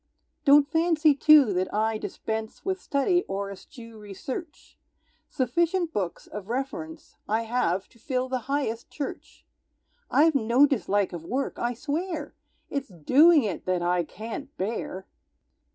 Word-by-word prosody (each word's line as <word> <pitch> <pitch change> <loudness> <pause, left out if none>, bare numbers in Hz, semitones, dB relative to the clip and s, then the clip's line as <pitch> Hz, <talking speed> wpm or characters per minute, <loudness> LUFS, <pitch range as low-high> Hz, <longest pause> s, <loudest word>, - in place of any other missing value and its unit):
Don't 285 0 +7
fancy 320 -1 +3
too 285 -5 +6
that 185 +1 -1
I 220 +1 0
dispense 220 0 -5
With 380 -1 -2
study, 350 +6 +1
or 195 +1 -3
eschew 230 +3 -12
research; 210 - -8 0.5
Sufficient 335 +7 0
books 185 -4 -3
of 210 0 -9
reference 280 +6 -5
I 220 +2 +1
have, 220 -6 0
to 235 - -23
fill 255 0 -2
the 260 0 -2
highest 265 -5 -2
church. 285 - -7 0.6
I've 320 +2 +4
no 255 +1 +4
dislike 205 -8 0
of 170 -2 -6
work, 260 +10 -3
I 240 0 -1
swear, 305 +3 -3 0.4
It's 280 -2 -2
doing 280 - +5
it 200 -5 -4
that 180 -1 0
I 175 0 +1
can't 230 - -8
bear! 190 -2 -4
250 Hz, 135 wpm, -26 LUFS, 210-295 Hz, 0.6 s, Don't